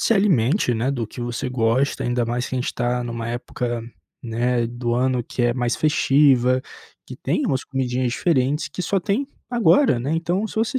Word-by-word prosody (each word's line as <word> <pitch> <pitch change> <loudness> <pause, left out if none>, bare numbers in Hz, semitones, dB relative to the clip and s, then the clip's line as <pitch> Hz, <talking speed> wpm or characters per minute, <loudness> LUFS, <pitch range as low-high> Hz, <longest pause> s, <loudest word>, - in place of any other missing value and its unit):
se 230 - +3
alimente, 175 - +2
né, 120 +5 0
do 120 -5 -2
que 120 - -10
você 120 +2 -3
gosta, 125 +3 +1
ainda 120 -1 0
mais 120 +1 -2
que - - -5
a - - 0
gente 125 - -2
está 120 0 -1
em - - -5
uma 115 0 -4
época, 120 0 -3 0.4
né, 120 0 0
do 120 0 -2
ano 125 0 +1
que 125 - -3
é 120 0 +3
mais 120 -2 0
festiva, 135 -4 +3 0.4
que - - -9
tem - - -1
umas 130 -1 -1
comidinhas 130 -2 -1
diferentes 145 -2 +1
que - - -7
só 195 +3 0
tem 210 +10 -1 0.2
agora, 240 - +4
né, 135 +6 -2
então, 175 +6 0
se - - -10
você 225 +4 0
125 Hz, 200 wpm, -22 LUFS, 120-150 Hz, 0.4 s, agora